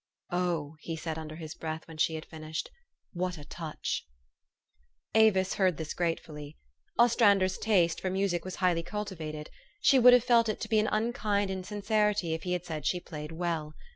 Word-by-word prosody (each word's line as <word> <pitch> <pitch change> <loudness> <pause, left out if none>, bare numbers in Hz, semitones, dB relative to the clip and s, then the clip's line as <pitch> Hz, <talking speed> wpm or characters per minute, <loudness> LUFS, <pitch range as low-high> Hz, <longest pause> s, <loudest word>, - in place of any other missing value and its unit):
" - - -34
Oh," 170 -4 -1
he 165 +1 -5
said 160 0 -4
under 155 -1 -7
his 160 -1 -7
breath 160 -1 -5
when 160 -1 -10
she 160 - +2
had 155 - -6
fin 160 - -11
ished, 155 +1 -4 0.2
" - - -52
what 180 -1 -2
a 145 - -10
touch 160 0 -4 0.6
!" 65 0 -45
Avis 190 -3 +3
heard 185 -4 +2
this 160 -1 -4
gratefully. 155 -3 -3 0.4
Ostrander's 205 -5 +4
taste 180 -7 +2
for 190 - -1
music 190 -2 0
was 185 - -6
highly 180 -3 +2
cultivated: 165 -5 -5 0.3
she 275 -8 +5
would 250 0 +9
have 245 -2 +6
felt 235 -2 +4
it 215 - -2
to 220 - -4
be 220 -2 +4
an 215 - +1
unkind 215 -3 0
insincerity 205 -1 0
if 160 - -3
he 180 +1 -2
had 180 0 -2
said 155 -4 -3
she 180 - +1
played 150 -2 -8
well. 160 -2 -3
175 Hz, 195 wpm, -30 LUFS, 160-205 Hz, 0.6 s, would